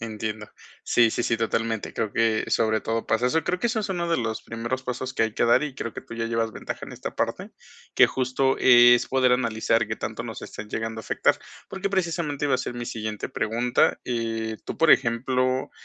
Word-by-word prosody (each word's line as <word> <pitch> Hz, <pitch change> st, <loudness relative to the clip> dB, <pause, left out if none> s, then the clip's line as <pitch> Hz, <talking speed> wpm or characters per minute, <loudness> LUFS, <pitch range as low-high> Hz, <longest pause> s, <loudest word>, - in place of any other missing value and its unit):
Entiendo. 110 Hz, -1 st, -5 dB, 0.4 s
Sí, 115 Hz, -1 st, +4 dB
sí, 120 Hz, -, -1 dB
sí, 115 Hz, -, +1 dB
totalmente, 115 Hz, -1 st, -2 dB
creo 110 Hz, -2 st, -2 dB
que 115 Hz, -1 st, +2 dB
sobre 110 Hz, -1 st, +2 dB
todo 115 Hz, 0 st, -2 dB
pasa 110 Hz, +2 st, +1 dB
eso, 145 Hz, +6 st, +2 dB
y -, -, -1 dB
creo 180 Hz, -, -1 dB
que 240 Hz, -, +1 dB
eso 225 Hz, -, -1 dB
es 210 Hz, -1 st, -2 dB
uno 175 Hz, -2 st, -2 dB
de 165 Hz, -, +3 dB
los 110 Hz, -2 st, -3 dB
primeros 120 Hz, +3 st, -4 dB
pasos 130 Hz, +1 st, -4 dB
que -, -, +1 dB
hay 110 Hz, -1 st, -1 dB
que -, -, +1 dB
dar 120 Hz, +5 st, +4 dB
y 150 Hz, -3 st, -4 dB
creo 115 Hz, -4 st, -5 dB
que -, -, -7 dB
tú -, -, -10 dB
ya 115 Hz, 0 st, -2 dB
llevas 115 Hz, 0 st, -1 dB
ventaja -, -, -6 dB
en -, -, -10 dB
esta -, -, -6 dB
parte, -, -, -2 dB, 0.4 s
que -, -, +7 dB
justo 130 Hz, +1 st, 0 dB
es 120 Hz, -1 st, +7 dB
poder 130 Hz, -1 st, +3 dB
analizar 115 Hz, -2 st, +1 dB
que 110 Hz, -, -3 dB
tanto 110 Hz, +1 st, -5 dB
nos 115 Hz, -2 st, -7 dB
estén 105 Hz, -, -8 dB
llegando 110 Hz, 0 st, -4 dB
a -, -, -12 dB
afectar, -, -, +1 dB, 0.3 s
porque, 195 Hz, +1 st, -3 dB
precisamente 170 Hz, -6 st, -1 dB
iba 140 Hz, -, +2 dB
a -, -, +1 dB
ser 125 Hz, -, -4 dB
mi 120 Hz, 0 st, -5 dB
siguiente 110 Hz, -2 st, -4 dB
pregunta, 120 Hz, +3 st, +1 dB
eh, 115 Hz, -2 st, -2 dB
tú, -, -, -6 dB
por 165 Hz, -1 st, +5 dB
ejemplo, 130 Hz, +2 st, +2 dB
115 Hz, 225 wpm, -25 LUFS, 110-130 Hz, 0.4 s, que